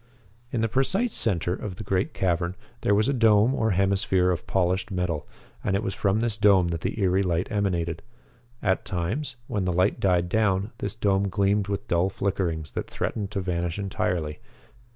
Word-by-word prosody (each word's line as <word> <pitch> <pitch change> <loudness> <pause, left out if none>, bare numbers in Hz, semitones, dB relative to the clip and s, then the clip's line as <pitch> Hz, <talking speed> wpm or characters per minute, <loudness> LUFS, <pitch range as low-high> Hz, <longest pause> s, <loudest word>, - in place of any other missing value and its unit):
In 115 - -1
the 115 - +2
precise 185 - +1
center 90 -5 +1
of 95 0 -5
the - - -7
great 95 0 0
cavern 90 -1 0 0.3
there 100 - +3
was 105 +2 +3
a 140 - +2
dome 115 0 +4
or 110 -4 +1
hemisphere 95 -1 +2
of 85 - -3
polished 95 +1 +1
metal, 90 -5 -2 0.4
and 95 - +1
it 100 - 0
was 95 - -2
from 105 0 +1
this 115 -3 0
dome 100 -4 +5
that 85 -1 -3
the - - -3
eery 95 -1 +3
light 90 -2 -1
emanated. 85 -5 -1 0.6
At 95 - +1
times, 110 - -2
when 105 -7 -2
the 90 - +1
light 90 +3 +2
died 90 -2 +2
down, 100 +1 +1
this 105 - -3
dome 100 -2 +1
gleamed 100 0 +1
with 100 -1 -3
dull 85 +2 +2
flickerings 90 -7 -2
that - - -4
threatened 105 -3 -3
to 100 -2 -3
vanish 85 -1 -2
entirely. 90 -6 -2
95 Hz, 185 wpm, -26 LUFS, 90-105 Hz, 0.6 s, dome